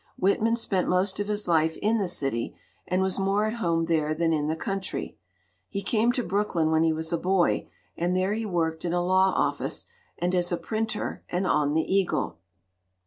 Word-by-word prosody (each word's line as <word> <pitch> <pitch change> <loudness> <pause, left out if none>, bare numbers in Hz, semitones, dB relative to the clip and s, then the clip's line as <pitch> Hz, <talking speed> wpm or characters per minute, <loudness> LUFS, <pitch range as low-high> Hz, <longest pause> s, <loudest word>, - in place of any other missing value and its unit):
Whitman 215 +4 +2
spent 195 -5 -1
most 185 +2 +1
of 205 - -1
his 210 -1 -1
life 160 -1 +2
in 220 +2 +2
the 195 - 0
city, 135 -9 -2 0.3
and 185 +1 +1
was 190 +1 -1
more 195 +2 +2
at 215 - -1
home 165 -2 +1
there 155 -2 +1
than 165 0 +1
in 150 -1 0
the 160 - 0
country. 195 +3 -4 0.5
He 200 - -4
came 225 +3 +2
to 250 - -1
Brooklyn 180 -5 0
when 160 0 +3
he 165 0 +3
was 160 +1 -2
a 170 - +1
boy, 185 0 +1 0.3
and 175 +2 0
there 185 +2 +1
he 225 +1 -2
worked 165 -5 -1
in 175 -1 -1
a 175 0 +1
law 190 +1 +4
office, - - -1 0.3
and 175 +1 -1
as 180 -1 +1
a 175 - +1
printer 220 +2 -3
and 180 +2 -1
on 150 -3 +2
the 160 - +3
Eagle. 190 - 0
180 Hz, 200 wpm, -27 LUFS, 165-200 Hz, 0.5 s, law